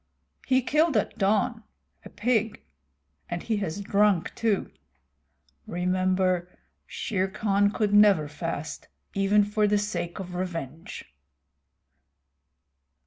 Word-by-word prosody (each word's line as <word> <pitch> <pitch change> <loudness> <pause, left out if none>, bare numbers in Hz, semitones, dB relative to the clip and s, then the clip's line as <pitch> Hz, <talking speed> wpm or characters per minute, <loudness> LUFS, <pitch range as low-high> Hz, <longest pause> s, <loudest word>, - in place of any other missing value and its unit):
"He 260 -1 +3
killed 300 0 +2
at 210 - -1
dawn, 215 +4 +1 0.4
a - - -10
pig, 225 -1 -1 0.7
and 175 0 -4
he 220 -2 -1
has 195 -1 -3
drunk 200 -3 +2
too. 220 -4 0 1.0
Remember, 185 0 0 0.4
Shere 190 -4 -2
Khan 200 +1 +1
could 205 0 -1
never 205 -7 +6
fast, 155 0 -5 0.3
even 200 +1 +3
for 210 +1 +1
the 205 0 +3
sake 175 -5 -3
of 185 -3 -7
revenge." 165 -5 -5
200 Hz, 105 wpm, -26 LUFS, 180-210 Hz, 1.0 s, never